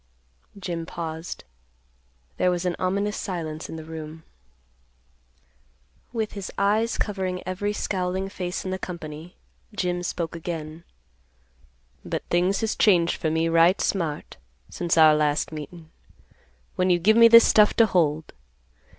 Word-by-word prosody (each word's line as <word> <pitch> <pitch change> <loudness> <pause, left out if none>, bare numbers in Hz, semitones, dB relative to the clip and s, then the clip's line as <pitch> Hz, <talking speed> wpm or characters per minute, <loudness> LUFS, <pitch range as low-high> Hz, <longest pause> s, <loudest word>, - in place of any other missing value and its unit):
Jim 175 -4 -4
paused. 165 0 -6 0.9
There 180 - +2
was 180 0 -1
an 180 - 0
ominous 200 +3 -1
silence 160 -5 -5
in - - -6
the 160 - -7
room. 160 0 -8 1.9
With 220 -3 -2
his 200 -2 -7
eyes 215 +3 +1
covering 190 -3 -3
every 185 +3 -2
scowling 190 -2 -2
face 180 -2 -5
in 185 - -3
the 190 - -3
company, 165 -1 -8 0.4
Jim 180 -3 -1
spoke 170 -1 -4
again, 165 -1 -6 1.2
"But - - -4
things 180 +4 +2
has 220 -1 -1
changed 175 -5 +3
for 160 - -1
me 160 +1 +1
right 165 +3 +4
smart, 165 -6 -2 0.3
since 170 -1 -1
our 155 -1 +7
last 150 0 0
meetin', 160 +2 -9 0.9
when 185 0 +2
you 175 - +4
give 205 +6 +3
me 230 0 +8
this 230 0 +8
stuff 210 -1 +5
to 230 - +6
hold. 160 -6 0
175 Hz, 135 wpm, -24 LUFS, 160-195 Hz, 1.9 s, me